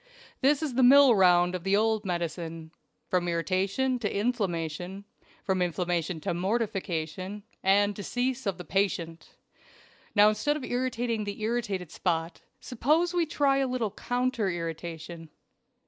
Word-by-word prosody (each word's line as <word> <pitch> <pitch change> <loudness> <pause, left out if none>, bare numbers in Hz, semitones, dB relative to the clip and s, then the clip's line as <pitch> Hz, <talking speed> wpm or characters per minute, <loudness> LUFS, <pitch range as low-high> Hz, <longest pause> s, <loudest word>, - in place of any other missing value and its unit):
This 285 +3 +3
is 295 -5 -2
the 260 - +2
mill 270 0 +8
round 180 -3 +4
of 180 -2 -4
the 195 +1 +2
old 220 0 +1
medicine; 165 -2 -4 0.4
from 180 -1 0
irritation 195 +9 0
to 210 -4 -2
inflammation, 190 -4 -2 0.4
from 190 -2 0
inflammation 175 -1 -1
to - - -2
mortification, 190 -2 -2 0.2
and 205 +2 +3
decease 245 +4 -2
of 195 - -1
the 180 - -8
patient. 170 -4 -2 0.8
Now, 205 0 +7
instead 215 +8 +1
of 290 - -8
irritating 245 -3 -1
the 205 +1 -5
irritated 215 -7 -2
spot, 165 -2 -2 0.2
suppose 310 +8 +1
we 345 -2 +1
try 280 -2 +2
a 270 -1 +1
little 250 -5 -2
counter 245 -4 -1
irritation." 165 -1 -6
200 Hz, 135 wpm, -28 LUFS, 175-245 Hz, 0.8 s, mill